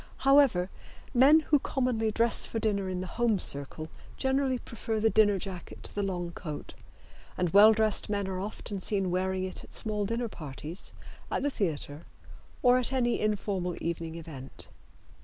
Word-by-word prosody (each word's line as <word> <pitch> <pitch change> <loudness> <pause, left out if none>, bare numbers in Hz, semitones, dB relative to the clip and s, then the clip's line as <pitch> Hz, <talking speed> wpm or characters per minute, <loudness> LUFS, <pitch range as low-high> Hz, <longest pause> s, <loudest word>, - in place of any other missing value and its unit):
However, 270 -10 +5 0.4
men 275 +5 +6
who 295 -1 +2
commonly 250 -5 0
dress 230 +2 +2
for - - -4
dinner 200 -3 0
in 185 -1 -3
the - - -4 0.2
home 230 -3 +3
circle 145 -1 +1 0.3
generally 265 -1 +1
prefer 225 -2 -4
the 220 +1 +3
dinner 205 -2 +4
jacket 185 -2 -7
to - - -8
the 205 - -2
long 180 -3 -3
coat, 155 -4 -7 0.6
and 180 -2 0
well 205 +3 +8
dressed 220 -1 +1
men 200 -2 -1
are 185 -1 -3
often 205 0 -5
seen 190 -1 -1
wearing 185 +1 0
it 185 0 -5
at - - -16
small 210 -2 -2
dinner 230 +2 -1
parties, 155 -1 -8 0.4
at - - -1
the 285 - +1
theater 155 - -3 0.6
or 250 0 +6
at 255 - -1
any 245 -3 +1
informal 195 -4 -1
evening 165 -1 -4
event. 155 -6 -10
205 Hz, 165 wpm, -29 LUFS, 180-230 Hz, 0.6 s, well